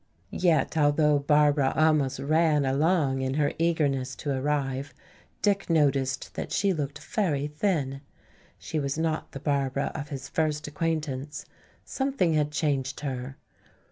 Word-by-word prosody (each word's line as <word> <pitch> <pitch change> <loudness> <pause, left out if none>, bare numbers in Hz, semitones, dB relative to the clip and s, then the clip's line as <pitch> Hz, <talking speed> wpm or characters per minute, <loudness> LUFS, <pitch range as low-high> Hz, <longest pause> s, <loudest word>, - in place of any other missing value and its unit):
Yet 170 -3 +2
although 150 0 +3
Barbara 145 -1 +3
almost 155 -4 +3
ran 150 +1 +2
along 140 0 +2
in 130 0 -1
her 145 -1 +1
eagerness 140 -6 +1
to 145 - -4
arrive, 135 -1 -2 0.5
Dick 200 -3 +1
noticed 140 -5 +1
that - - -5
she 200 -2 +2
looked 145 -3 -3
very 150 -10 -1
thin. 150 -4 -1 0.6
She 155 - -4
was 140 0 -2
not 160 -1 -1
the 135 - -7
Barbara 140 -1 -1
of 145 -2 -6
his 135 -2 -6
first 150 0 -1
acquaintance; 150 -2 -3 0.4
something 265 -11 0
had 150 -1 +2
changed 140 -4 -1
her. 135 -1 -5
145 Hz, 135 wpm, -27 LUFS, 135-160 Hz, 0.6 s, although